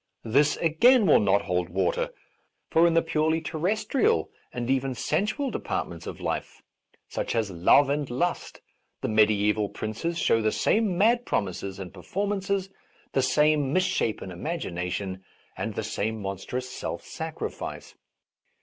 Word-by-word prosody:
This, 140 +6 +3
again, 215 +9 +5
will 155 - +6
.not 100 -1 +3
hold 90 -1 -1
water; 95 +1 0 0.6
for 165 +1 +5
in 165 - +1
the 165 - +4
purely 160 0 +1
terrestrial 210 - 0 0.2
and 120 -1 -4
even 135 0 0
sensual 215 - -1
departments 85 - -4
of - - -6
life, - - -4 0.4
such - - -3
as 110 -4 0
love 90 +11 +5
and 145 0 -1
lust, 170 +9 -2 0.4
the - - -1
mediaeval 105 -1 +3
princes 110 +12 -3
show 115 - +3
\the 110 0 +2
same 210 - +1
mad 235 +5 +4
promises 95 - -2
and 95 -2 -8
performances, 195 - -2 0.4
the 135 - +2
same 150 +1 +3
misshapen 185 - 0
imagination 95 - -4 0.3
and - - -4
the - - -2
same 110 +1 -2
monstrous 100 +6 -4
self 125 - -5
sacrifice. - - -6
135 Hz, 135 wpm, -27 LUFS, -, 0.6 s, will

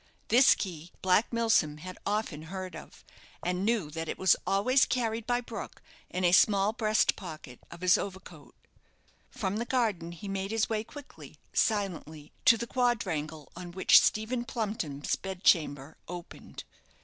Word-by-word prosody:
This 255 +3 +6
key 175 -3 -6
Black 190 +4 +3
Milsom 225 -11 +2
had 185 +4 -9
often 205 -7 -2
heard 185 -1 -6
of, - - -12 0.4
and 180 +1 -1
knew 210 -8 0
that 165 0 -5
it - - -3
was 190 - +4
always 255 +7 +3
carried 230 -2 -2
by 245 0 +1
Brook 230 -3 -8 0.3
in 185 - -3
a 175 - +4
small 200 +2 +4
breast 215 -1 +2
pocket 155 -9 -9
of 170 - -11
his 185 0 +4
overcoat. 190 -1 -8 0.7
From 205 -5 -3
the 230 - -1
garden 215 -10 -1
he 170 +4 -9
made 195 0 -3
his 225 0 0
way 215 -1 -1
quickly, 290 +4 -12 0.2
silently, 175 -8 -1
to 230 - +7
the 235 - -4
quadrangle 180 - -1
on 175 0 -8
which 190 - +6
Stephen 230 +3 0
Plumpton's 205 - -3
bed 190 -1 -7
chamber 145 -3 +2
opened. 175 0 -9
195 Hz, 155 wpm, -29 LUFS, 170-225 Hz, 0.7 s, to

